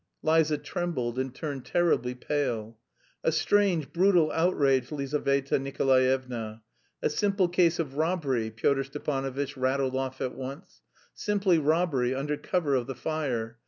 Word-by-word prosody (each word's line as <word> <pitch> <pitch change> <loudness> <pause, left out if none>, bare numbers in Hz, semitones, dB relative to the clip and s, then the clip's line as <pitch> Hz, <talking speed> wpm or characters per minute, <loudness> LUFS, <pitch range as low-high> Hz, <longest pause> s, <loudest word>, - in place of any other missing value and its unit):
Liza 155 -1 +3
trembled 130 -7 -3
and 130 0 -2
turned 140 -1 -5
terribly 165 -8 +1
pale. 125 -5 -2 0.5
"A - - +3
strange 180 -2 +2
brutal 175 -3 +4
outrage, 140 -7 +2
Lizaveta 140 -1 0
Nikolaevna. 130 -4 0 0.4
A - - +3
simple 195 +2 +1
case 175 -1 +3
of 145 -4 -3
robbery," 150 -9 0
Pyotr 135 +5 +1
Stepanovitch 135 0 -3
rattled 130 0 0
off 130 0 -3
at 130 -1 -2
once 135 +8 -8 0.3
"Simply 195 -5 +1
robbery, 150 -5 +1
under 145 +2 -1
cover 155 -2 -1
of 125 -3 +1
the 135 - -5
fire. 125 -6 -3
140 Hz, 130 wpm, -28 LUFS, 130-160 Hz, 0.5 s, brutal